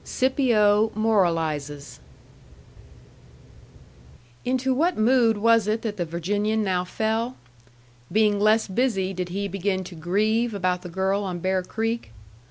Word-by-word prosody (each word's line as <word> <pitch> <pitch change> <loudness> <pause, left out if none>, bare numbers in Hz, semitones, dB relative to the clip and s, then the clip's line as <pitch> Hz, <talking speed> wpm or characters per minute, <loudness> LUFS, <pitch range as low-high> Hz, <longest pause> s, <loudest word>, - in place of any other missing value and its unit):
XVII. - - -15
SCIPIO 225 -5 +2
MORALIZES 165 -9 -1 2.4
Into 260 +1 0
what 335 +7 +1
mood 230 -1 +3
was 230 0 +3
it 220 +1 -1
that 210 -2 -3
the 175 - -1
Virginian 205 +6 -1
now 185 -3 0
fell? 220 +6 -2 0.7
Being 210 -1 +2
less 215 +2 +3
busy, 195 -3 0
did 180 -1 -4
he 200 +3 -3
begin 195 0 -2
to 180 - -10
"grieve" 215 +7 0
about 180 -2 -1
the 180 - -8
girl 190 +3 -1
on 185 -3 -4
Bear 185 +2 0
Creek? 225 - -3
205 Hz, 130 wpm, -24 LUFS, 185-225 Hz, 2.4 s, mood